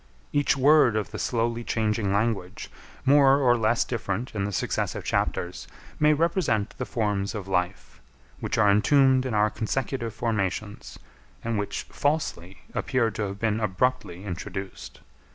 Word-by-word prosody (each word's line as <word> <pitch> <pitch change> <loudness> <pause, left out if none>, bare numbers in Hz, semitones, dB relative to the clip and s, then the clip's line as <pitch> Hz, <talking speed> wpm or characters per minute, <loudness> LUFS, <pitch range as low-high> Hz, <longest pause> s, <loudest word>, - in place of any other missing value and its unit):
Each 145 -1 +2
word 140 -4 +5
of 110 -2 -2
the - - -6
slowly 120 0 -1
changing 110 -3 0
language, 100 -2 -1 0.3
more 140 0 +6
or 125 -4 +4
less 115 0 +2
different 115 0 -3
in 100 -2 -1
the 100 - -3
successive - - -2
chapters, 90 +1 -2 0.3
may 150 0 +5
represent 155 - +1
the 130 - -3
forms 105 -2 -1
of 100 -3 -5
life, 90 -5 -2 0.4
which - - -2
are 105 -2 +5
entombed 130 +4 +4
in 120 - -2
our 105 0 +3
consecutive 115 +1 -3
formations, 105 -3 -3 0.5
and 115 -2 -1
which 100 - -3
falsely 145 - -2
appear 130 -5 0
to 105 0 -3
have 100 0 -6
been 110 0 0
abruptly 105 -3 -1
introduced. 95 +1 -7
110 Hz, 145 wpm, -26 LUFS, 100-130 Hz, 0.5 s, more